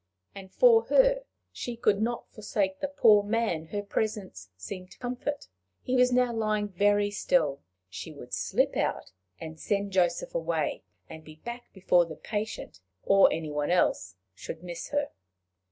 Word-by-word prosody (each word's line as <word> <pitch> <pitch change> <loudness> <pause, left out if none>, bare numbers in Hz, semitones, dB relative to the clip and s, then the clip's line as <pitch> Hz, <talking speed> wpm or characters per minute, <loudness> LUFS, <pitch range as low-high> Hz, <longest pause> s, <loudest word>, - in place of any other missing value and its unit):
And 190 -1 -11
for 465 -2 +5
her, - - +3 0.3
she 240 -1 -6
could 210 -3 +2
not 235 +2 -2
forsake 205 -3 -2
the 285 - -1
poor 230 -7 +5
man 205 -7 -1
her 205 +4 -4
presence 200 - -3
seemed 185 - -8
to - - -16
comfort! 255 +4 -4 0.4
He 255 - -1
was 250 0 +4
now 250 -1 +2
lying 215 -2 0
very 205 +2 +2
still: 150 - +1 0.3
she 95 - -8
would 135 -5 -12
slip 95 -1 +1
out - - -2 0.3
and 160 0 -8
send 200 -1 -1
Joseph 190 - +1
away, - - -1 0.3
and 160 - -10
be 155 0 -13
back 240 +9 -9
before 180 -2 +3
the 160 - -8
patient 215 - -5 0.2
or 195 0 +5
any 160 -2 -3
one 150 0 -1
else 95 - +1 0.2
should 160 - -8
miss 175 -1 -6
her! 290 0 -1
205 Hz, 160 wpm, -28 LUFS, 170-240 Hz, 0.4 s, for